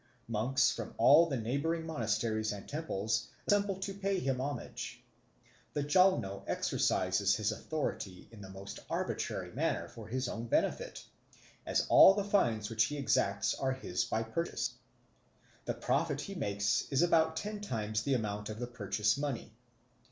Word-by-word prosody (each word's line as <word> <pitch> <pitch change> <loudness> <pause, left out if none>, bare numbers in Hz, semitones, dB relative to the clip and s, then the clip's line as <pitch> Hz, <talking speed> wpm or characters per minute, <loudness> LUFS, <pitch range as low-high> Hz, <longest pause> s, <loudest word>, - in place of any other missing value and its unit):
Monks 125 +4 +2
from 115 - -6
all 165 +8 +7
the 135 -5 -1
neighbouring 140 +8 -1
monasteries 110 -6 -1
and 100 -1 -7
temples 115 -9 -2 0.2
assemble 205 -1 +2
to 190 +1 -4
pay 195 0 -1
him 135 -6 -1
homage. 140 -1 -5 0.7
The 145 - -1
Jalno 150 - +3
exercises 95 +2 +1
his 105 -1 0
authority 115 -11 -4
in 110 -3 -12
the 95 - -9
most 95 +1 -8
arbitrary - - -2
manner - - -1
for 110 -3 -11
his 130 +2 -2
own 115 0 -4
benefit, - - -1 0.6
as - - +2
all 195 - +9
the 205 - 0
fines 120 - +1
which 110 0 +2
he 150 - -4
exacts 100 -7 +1
are 135 -1 -1
his 130 -9 -2
by 110 - -1
purchase. 165 +10 -2 0.9
The - - -2
profit - - 0
he 200 - -6
makes 100 - 0
is 140 +3 +3
about 160 -2 +3
ten 210 +4 -4
times 110 - -2
the 140 +2 +1
amount 105 -3 -3
of 110 - -5
the 120 - -3
purchase 105 0 0
money. 135 -6 -3
120 Hz, 155 wpm, -33 LUFS, 105-160 Hz, 0.9 s, all